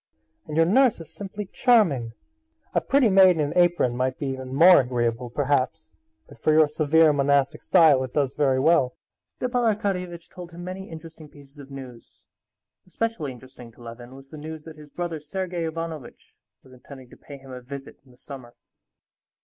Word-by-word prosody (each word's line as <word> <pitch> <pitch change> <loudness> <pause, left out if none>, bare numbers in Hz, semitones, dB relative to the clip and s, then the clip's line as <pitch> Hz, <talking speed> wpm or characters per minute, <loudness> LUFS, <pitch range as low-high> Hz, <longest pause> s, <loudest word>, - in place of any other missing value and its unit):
"And 150 - -5
your 165 - +5
nurse 240 +5 +3
is 160 -1 -11
simply 205 +1 -7
charming! 180 - +2 0.6
A - - +2
pretty 275 -3 +3
maid 190 -3 +6
in - - -3
an 145 -1 -1
apron 175 -8 +2
might 130 +1 -1
be 145 - -5
even 130 -1 -6
more 165 +5 +7
agreeable, 120 -1 -2
perhaps; 140 +1 -1 0.4
but - - -16
for 155 - +1
your 155 0 +5
severe 155 +1 +3
monastic 140 -1 +1
style 150 -6 +4
it 130 - -6
does 140 -2 0
very 135 -3 +1
well." 140 -3 +2 0.3
Stepan 250 -1 -3
Arkadyevitch 180 -5 -4
told 175 -2 -11
him 175 +1 -9
many 185 +2 -7
interesting 160 -1 -11
pieces 145 0 -17
of 140 -1 -12
news; 130 -4 -12 0.6
especially 185 -7 -3
interesting 125 -1 -13
to 120 - -17
Levin 120 +2 -11
was 135 0 -14
the 155 - -10
news 155 0 -8
that 160 -1 -11
his 150 -1 -14
brother, 170 0 -5
Sergey 175 +2 -4
Ivanovitch, 160 -4 -7 0.3
was 130 - -18
intending 130 0 -14
to - - -13
pay 140 - -12
him 135 -1 -14
a 125 0 -8
visit 135 +2 -10
in 135 - -24
the 125 - -21
summer. 125 -3 -11
150 Hz, 180 wpm, -24 LUFS, 130-175 Hz, 0.6 s, more